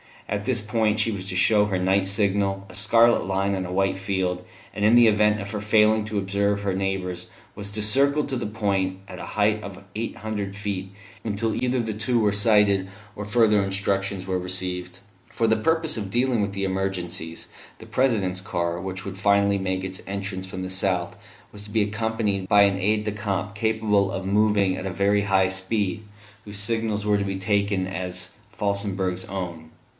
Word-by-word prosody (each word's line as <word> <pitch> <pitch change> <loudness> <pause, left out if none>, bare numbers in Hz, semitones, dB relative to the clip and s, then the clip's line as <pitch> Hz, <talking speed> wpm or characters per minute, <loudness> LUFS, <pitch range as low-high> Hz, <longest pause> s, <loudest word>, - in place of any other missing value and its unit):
At 100 0 -3
this 120 -3 +2
point 110 0 +1
she 110 +1 +1
was 95 -2 -5
to 95 - -4
show 105 +2 +4
her 100 -3 -1
night 95 +1 +2
signal, 100 -1 +1
a - - -11
scarlet 115 +3 +4
line 95 +1 0
on 95 -1 -2
a - - -7
white 95 +1 +1
field; 95 -2 -1 0.3
and 100 - -3
in 110 +3 +6
the 120 -1 +7
event 105 -1 +3
of 100 +1 -6
her 105 - -3
failing 110 0 +3
to 105 -1 -4
observe 100 +1 0
her 100 -1 -1
neighbours 95 -2 -3 0.3
was 100 -1 -6
to 105 +1 -2
circle 140 +7 +4
at - - -6
that 120 -5 -3
point, 95 -3 0
at - - -9
a - - -6
height 105 0 +1
of 100 -2 -9
eight 115 +2 -4
hundred 105 -2 -4
feet, 100 -2 -4 0.3
until 110 +1 -1
either 125 0 0
the 110 -1 -3
two 115 +4 0
were 105 -3 +3
sighted 100 -2 +4 0.3
or 105 - -5
further 105 -1 +3
instructions 95 0 -2
were 95 -1 -1
received. 90 0 -2 0.3
For 115 - -1
the 110 0 +3
purpose 160 +4 +1
of 100 -3 -4
dealing 120 +1 +1
with 100 -1 -2
emergencies, 95 -3 -3 0.3
the - - -11
President's 100 -8 0
car, 85 -2 -2
which 95 0 -5
would 95 0 -6
finally 100 0 +3
make 95 0 -2
its 95 0 -6
entrance 95 -1 -4
from 95 0 -6
the 95 - -4
south, 95 -2 -1 0.4
was 105 0 -10
to - - -9
be 110 +1 +1
accompanied 105 -2 -1
by 100 +1 +6
an 100 -1 +3
aide 105 +2 +1
de 105 - -2
camp 100 -1 -3
capable 105 -2 +1
of 95 - -4
moving 100 -1 +2
at - - -5
a 95 - -4
very 100 +2 +2
high 95 -1 +3
speed, 95 +2 -1 0.4
whose 105 -1 -6
signals 105 0 -1
were 105 -1 +3
to 100 - -1
be 95 -1 -2
taken 100 0 0
as 90 -1 -3 0.3
Felsenburgh's 100 -3 -1
own. 85 -4 -6
100 Hz, 195 wpm, -24 LUFS, 95-105 Hz, 0.4 s, the